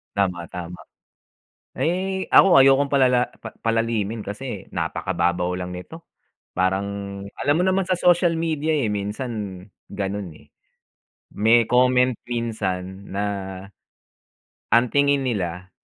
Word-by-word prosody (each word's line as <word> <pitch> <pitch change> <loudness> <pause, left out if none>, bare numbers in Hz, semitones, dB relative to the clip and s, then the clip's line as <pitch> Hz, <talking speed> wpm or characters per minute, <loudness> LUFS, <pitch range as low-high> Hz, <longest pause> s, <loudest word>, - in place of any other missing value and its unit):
Tama, 90 -4 -1
tama. 90 0 -7 1.0
Ay, 190 +3 -1
ako 190 -6 +7
ayokong 135 +1 +6
palala 130 -3 +3
pa 110 - -9
palalimin 115 -2 -1
kasi 105 0 -6
napakababaw 90 +1 -1
lang 90 0 -4
nito. 90 - -8 0.6
Parang 95 +2 +1 0.5
alam 145 +1 +1
mo - - +2
naman 190 0 +2
sa 185 - -1
social 175 -1 +3
media, 160 -1 0
eh, 140 -7 +1
minsan 105 -2 -4 0.3
ganun, 100 -2 -4
eh. - - -20 0.8
May 115 +2 +3
comment 125 0 +3
minsan 100 -5 -4
na 100 - -1 1.5
ang 120 +1 +4
tingin 140 +1 +3
nila, 95 -7 -3
115 Hz, 115 wpm, -23 LUFS, 95-135 Hz, 1.5 s, ako